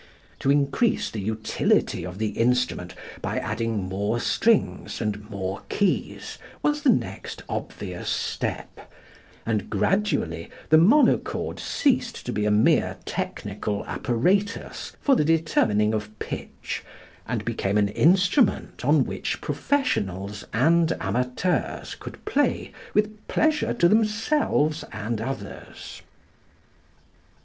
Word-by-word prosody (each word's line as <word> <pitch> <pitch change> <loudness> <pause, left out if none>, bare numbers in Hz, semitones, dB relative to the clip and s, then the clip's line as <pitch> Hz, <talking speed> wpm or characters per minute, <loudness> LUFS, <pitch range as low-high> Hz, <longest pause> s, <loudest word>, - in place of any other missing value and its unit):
To 135 - 0
increase 145 - +2
the 105 - -4
utility 110 -4 0
of 90 +1 -8
the 110 0 0
instrument 120 -7 0 0.3
by - - -2
adding 115 -3 -1
more 100 +5 -1
strings 225 - +1
and 105 -1 -3
more 95 -2 -4
keys 200 -2 -1 0.2
was 295 0 +1
the 285 - +3
next 230 - -1
obvious - - -5
step, - - -3 0.5
and 110 -3 -1
gradually 105 - 0 0.2
the 155 - +7
monochord 230 - +3
ceased 250 -5 0
to 125 - -3
be 105 - 0
a - - +3
mere 105 +1 +3
technical 105 -1 -3
apparatus 190 - -1
for 275 - +4
the - - +3
determining 130 -10 +2
of 105 0 -4
pitch - - -5 0.4
and - - -2
became 100 +1 0
an 100 -1 +3
instrument 180 - +3
on - - +4
which - - -3
professionals 100 - -1
and 165 +7 +3
amateurs 125 +9 -1
could - - -10
play 290 +1 0 0.2
with 210 0 0
pleasure 310 -1 +2
to 175 - +4
themselves 215 - +2
and 110 +1 -3
others. 135 +3 -7
125 Hz, 115 wpm, -25 LUFS, -, 0.5 s, the